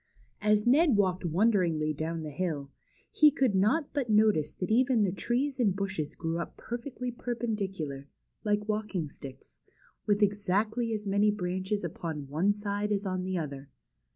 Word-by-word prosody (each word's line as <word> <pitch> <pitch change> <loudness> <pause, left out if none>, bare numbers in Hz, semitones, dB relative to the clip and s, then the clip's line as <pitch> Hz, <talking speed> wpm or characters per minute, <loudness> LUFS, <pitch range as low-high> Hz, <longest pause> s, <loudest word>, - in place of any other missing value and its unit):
As 210 0 +3
Ned 275 0 +5
walked 185 -2 +1
wonderingly 170 -4 +2
on - - -5
down 160 +2 -3
the 155 - -5
hill, 145 -3 -3 0.4
he 305 - +7
could 260 -5 +1
not 215 +11 +2
but 275 -5 -1
notice 210 -8 +3
that 180 - -4
even 245 -1 +4
the 190 - +1
trees 255 +7 -1
and 205 -6 +3
bushes 190 -6 -3
grew 165 0 -2
up 170 - -6
per 240 +1 -5
fectly 250 -1 -6
perpendicular, 195 - -3 0.4
like 210 0 0
walking 210 -6 -2
sticks, 135 -2 -11 0.5
with 205 0 +3
exactly 205 +3 +1
as 210 -1 -3
many 200 +1 +3
branches 190 0 -2
upon 160 -4 -5
one 165 +8 +2
side 205 0 -2
as 205 0 0
on 185 -1 -1
the 185 0 -1
other. 140 -4 -5
200 Hz, 165 wpm, -29 LUFS, 170-220 Hz, 0.5 s, he